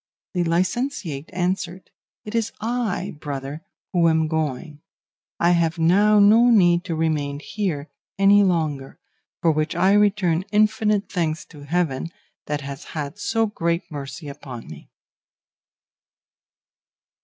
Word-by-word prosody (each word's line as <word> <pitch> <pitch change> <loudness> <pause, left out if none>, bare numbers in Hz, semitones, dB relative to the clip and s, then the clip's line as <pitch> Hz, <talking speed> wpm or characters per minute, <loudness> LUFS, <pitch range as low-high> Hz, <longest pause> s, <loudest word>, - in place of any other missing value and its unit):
The 180 -2 +1
licentiate 175 - -1
answered, 180 0 -3 0.3
'It 210 - -7
is 230 -1 0
I, 220 -5 -2
brother, 145 0 -5 0.3
who 170 -2 +4
am 160 -1 +2
going; 155 -1 -3 0.6
I 170 - +4
have 170 -1 +1
now 200 +6 +4
no 220 +4 +6
need 175 -6 +4
to 170 -3 -2
remain 150 -3 -1
here 165 -4 -3 0.3
any 200 +1 +6
longer, 155 -8 0 0.5
for 165 - +5
which 155 0 -1
I 190 +2 +4
return 200 -5 +2
infinite 215 -1 +2
thanks 160 -4 -2
to 145 -2 -11
Heaven 160 -2 -1 0.4
that 150 0 -2
has 140 0 -7
had 150 +5 -4
so 225 +2 +1
great 170 -6 -2
mercy 145 +2 -7
upon 140 -4 -8
me. 75 -1 -12
170 Hz, 125 wpm, -23 LUFS, 150-200 Hz, 0.6 s, no